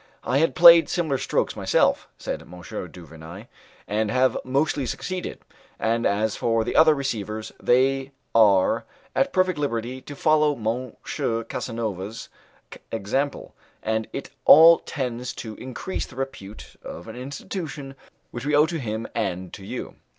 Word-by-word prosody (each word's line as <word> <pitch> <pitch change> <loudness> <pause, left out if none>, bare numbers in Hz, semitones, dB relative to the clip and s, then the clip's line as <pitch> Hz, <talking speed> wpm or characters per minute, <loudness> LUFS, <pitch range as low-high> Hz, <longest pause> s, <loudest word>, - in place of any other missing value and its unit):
"I 130 +3 +1
have 165 - +2
played 170 -1 +9
similar 155 -7 0
strokes - - -1
myself," - - +2
said - - -4
M. - - -16 0.4
du 90 -2 -12
Vernai, 80 +6 -11 0.4
"and 105 +1 0
have 130 +1 +2
mostly 140 +1 0
succeeded; 185 +7 -5 0.4
and 115 +1 +1
as 105 +1 0
for 115 -1 +1
the 115 - -4
other 160 -1 +6
receivers 110 -6 -4
they 135 +2 +2 0.2
are 100 -5 +4 0.3
at 275 - +2
perfect 185 -3 +1
liberty 125 -2 -2
to 145 - -9
follow 150 0 +3
M. 120 +2 -3 0.5
Casanova's 110 -3 -5 0.6
example, 130 +7 -2 0.3
and 110 0 -1
it - - -6
all 165 +2 +9
tends 125 -3 -4
to 110 -2 -7
increase 130 +9 -5
the 130 - -15
repute 135 -6 -7
of 85 - -9
an 110 - -8
institution 140 +2 -6 0.4
which 120 - -6
we 145 +1 +1
owe 150 +1 +6
to 165 0 -4
him 110 -3 -4
and 95 -5 -3
to 100 - -9
you." 120 +6 -7
125 Hz, 145 wpm, -24 LUFS, 110-145 Hz, 0.6 s, played